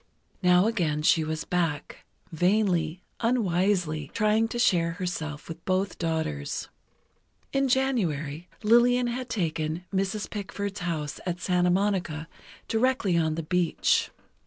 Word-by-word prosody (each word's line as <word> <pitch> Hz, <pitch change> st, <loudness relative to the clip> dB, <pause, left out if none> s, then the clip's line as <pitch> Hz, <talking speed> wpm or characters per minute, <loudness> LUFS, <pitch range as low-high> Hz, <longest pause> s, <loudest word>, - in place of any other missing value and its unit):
Now 180 Hz, 0 st, +5 dB
again 165 Hz, -10 st, 0 dB
she 160 Hz, +1 st, +4 dB
was 155 Hz, 0 st, -3 dB
back, 165 Hz, -5 st, -2 dB, 0.3 s
vainly, 180 Hz, -1 st, +1 dB, 0.2 s
unwisely 180 Hz, -, +1 dB
trying 220 Hz, 0 st, +3 dB
to 240 Hz, -, -5 dB
share 170 Hz, -8 st, +3 dB
herself 160 Hz, -5 st, -4 dB
with 165 Hz, 0 st, -8 dB
both 185 Hz, +1 st, -1 dB
daughters. 160 Hz, -, -2 dB, 0.8 s
In 275 Hz, 0 st, +2 dB
January, 180 Hz, -, 0 dB
Lillian 240 Hz, +3 st, +5 dB
had 245 Hz, +1 st, -3 dB
taken 165 Hz, -4 st, -2 dB
Mrs. 195 Hz, +2 st, -1 dB
Pickford's 200 Hz, -1 st, -5 dB
house 160 Hz, -5 st, -3 dB
at 180 Hz, 0 st, -2 dB
Santa 180 Hz, -1 st, +2 dB
Monica, 175 Hz, -5 st, 0 dB, 0.4 s
directly 225 Hz, -5 st, +1 dB
on 160 Hz, -2 st, +1 dB
the 165 Hz, -, -3 dB
beach. 175 Hz, +1 st, +1 dB
180 Hz, 120 wpm, -27 LUFS, 160-210 Hz, 0.8 s, Now